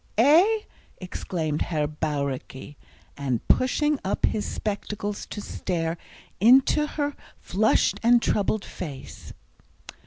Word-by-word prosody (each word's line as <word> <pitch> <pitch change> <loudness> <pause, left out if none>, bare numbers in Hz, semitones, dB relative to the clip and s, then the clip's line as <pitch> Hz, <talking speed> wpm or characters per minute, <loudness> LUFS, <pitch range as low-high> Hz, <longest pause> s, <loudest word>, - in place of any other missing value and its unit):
"Eh?" 340 - +5 0.4
exclaimed 165 -4 -3
Herr 155 -3 0
Bauricke, 145 -2 -4 0.4
and 130 -5 -3
pushing 295 +3 +2
up 195 - 0
his 210 - -1
spectacles 205 0 -4
to 205 - -6
stare 165 -5 -3 0.4
into 260 +7 +5
her 290 -1 -3 0.2
flushed 215 +4 +2
and 240 +1 +5
troubled 210 -2 0
face. 140 -6 -8
200 Hz, 100 wpm, -25 LUFS, 155-255 Hz, 0.4 s, Eh